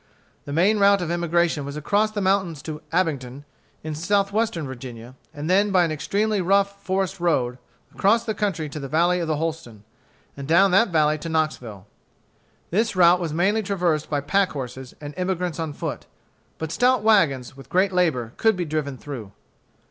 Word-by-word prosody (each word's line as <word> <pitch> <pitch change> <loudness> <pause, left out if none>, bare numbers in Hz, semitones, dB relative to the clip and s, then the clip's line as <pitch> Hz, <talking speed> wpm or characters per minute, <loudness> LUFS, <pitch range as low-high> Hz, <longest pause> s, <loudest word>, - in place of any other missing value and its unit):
The 145 - -7
main 190 +8 +3
route 200 -2 +4
of 170 - -3
emigration 170 -2 +1
was 140 +1 -6
across 205 +8 +1
the 215 -1 -4
mountains 190 -6 0
to 155 -1 -6
Abingdon, 145 -6 -2 0.4
in 155 0 -4
Southwestern 200 +2 0
Virginia, 125 -2 -9 0.2
and 145 +1 -6
then 200 +4 +3
by 185 -2 +4
an 165 - 0
extremely 205 +7 0
rough 200 +2 +1
forest 190 0 -1
road 130 -8 0 0.3
across 220 +3 +3
the 225 -2 -2
country 195 -7 -2
to 150 - -6
the 140 - -5
valley 175 +5 +2
of 170 - -2
the 155 - 0
Holston, 150 -9 -5 0.5
and 140 -1 -7
down 175 +5 +5
that 225 +6 +5
valley 155 -2 +2
to 165 - -6
Knoxville. 125 - -2 0.9
This 220 +4 +1
route 175 0 +6
was 170 -3 -3
mainly 190 +7 +1
traversed 180 -7 -1
by 145 -2 0
pack 185 +7 +1
horses 130 -2 -7
and 145 -1 -8
emigrants 180 -2 -2
on 160 -2 -2
foot. - - -6 0.5
But 160 -1 -5
stout 245 +4 +2
wagons, 140 - +2
with 135 -1 -14
great 190 +2 +2
labor, 150 -11 0
could 220 -1 +3
be 180 -1 -2
driven 150 -3 -3
through. 120 -8 -8
170 Hz, 180 wpm, -23 LUFS, 145-195 Hz, 0.9 s, route